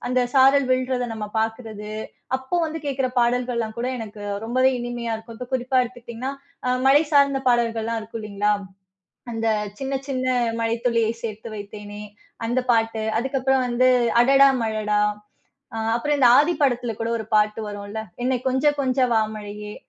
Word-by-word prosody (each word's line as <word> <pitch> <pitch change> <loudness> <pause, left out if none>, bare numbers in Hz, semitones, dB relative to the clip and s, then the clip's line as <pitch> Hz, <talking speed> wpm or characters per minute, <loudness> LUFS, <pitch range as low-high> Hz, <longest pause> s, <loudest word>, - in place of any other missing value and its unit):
அந்த 255 0 +2
சாரல் 270 0 +5
விழுறத 255 -1 0
நம்ம 210 -1 -5
பாக்கறது, 220 -1 -3 0.5
அப்போ 265 +7 -3
வந்து 320 +1 -5
கேக்குற 270 -2 0
பாடல்கள்லாம் 240 -2 0
கூட 240 - -1
எனக்கு 210 -2 -8 0.2
ரொம்பவே 255 +3 +3
இனிமையா 240 -1 -3
இருக்கும். 225 +1 -9
இப்போ 250 0 -7
குறிப்பா 255 +1 0
எடுத்துக்கிட்டீங்கன்னா, 245 +1 -6 0.3
அ - - 0 0.2
மழை 290 +3 +6
சார்ந்த 280 -1 +4
பாடல்கள்லாம் 230 -2 +1
இருக்கும் 220 +1 -7
இல்லிங்களா, 210 0 0 0.8
அந்த 225 0 -2 0.3
"சின்ன 270 0 -3
சின்ன 255 -2 -2 0.3
மழை 225 0 0
துளியை 230 -2 +2
சேர்த்து 220 0 -5
வைத்தேனே", 205 0 -8 0.4
அந்த 240 +3 +1
பாட்டு, 225 -1 +1 0.2
அதுக்கு 265 +3 -1
அப்புறம் 265 0 +2
வந்து 245 +1 +3 0.3
"அடடா 275 +2 +6
மழடா" 215 -2 0 0.8
அ - - -3 0.2
அப்புறம், 295 +5 0
இந்த 255 -3 +6
ஆதி 310 +5 +3
படத்துல 245 -4 +1
கூட 230 0 -2
ஒரு 220 - -5
பாட்டு 210 +1 +2
வரும்ல்ல? 205 +1 -6 0.2
"என்னை 255 0 +1
கொஞ்ச 265 +2 0 0.2
கொஞ்ச 265 -1 0
வா 220 - +4 0.2
மழையே". 210 0 -7
235 Hz, 155 wpm, -23 LUFS, 220-260 Hz, 0.8 s, மழை